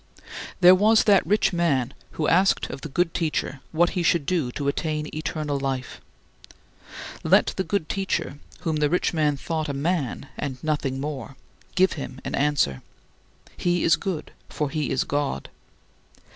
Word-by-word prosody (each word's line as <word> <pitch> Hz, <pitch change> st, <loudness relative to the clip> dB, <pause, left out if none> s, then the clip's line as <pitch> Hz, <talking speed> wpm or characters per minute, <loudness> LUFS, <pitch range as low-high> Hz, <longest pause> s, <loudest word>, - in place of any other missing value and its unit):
There 180 Hz, 0 st, +9 dB
was 215 Hz, +4 st, +5 dB
that 200 Hz, -3 st, +5 dB
rich 210 Hz, +1 st, +2 dB
man 140 Hz, -7 st, +1 dB, 0.2 s
who 155 Hz, -, -1 dB
asked 190 Hz, +3 st, +3 dB
of -, -, -7 dB
the 155 Hz, -, -6 dB
good 165 Hz, +4 st, 0 dB
Teacher 155 Hz, -4 st, -1 dB
what 170 Hz, +2 st, +3 dB
he 180 Hz, -, -1 dB
should 165 Hz, -3 st, +2 dB
do 160 Hz, -8 st, 0 dB
to 140 Hz, -, -3 dB
attain 150 Hz, +1 st, -1 dB
eternal 150 Hz, -2 st, -2 dB
life. 135 Hz, -2 st, -3 dB, 1.2 s
Let -, -, +4 dB
the 190 Hz, -, 0 dB
good 195 Hz, -5 st, -1 dB
Teacher 190 Hz, -6 st, -2 dB, 0.2 s
(whom 160 Hz, -2 st, -1 dB
the 150 Hz, -1 st, +2 dB
rich 180 Hz, +2 st, +1 dB
man 150 Hz, -3 st, +1 dB
thought 160 Hz, +1 st, -3 dB
a -, -, -1 dB
man 145 Hz, -2 st, -1 dB
and 135 Hz, -3 st, -3 dB
nothing 145 Hz, -4 st, -1 dB
more) 140 Hz, -3 st, -5 dB, 0.4 s
give 190 Hz, 0 st, +4 dB
him 135 Hz, -3 st, -7 dB
an -, -, -4 dB
answer 140 Hz, -, +1 dB, 0.7 s
he 175 Hz, -1 st, 0 dB
is 165 Hz, -, +5 dB
good 180 Hz, -6 st, -4 dB, 0.2 s
for 150 Hz, -2 st, -2 dB
he 155 Hz, -3 st, -1 dB
is 130 Hz, -, +1 dB
God. 145 Hz, -, -2 dB
155 Hz, 160 wpm, -25 LUFS, 140-175 Hz, 1.2 s, There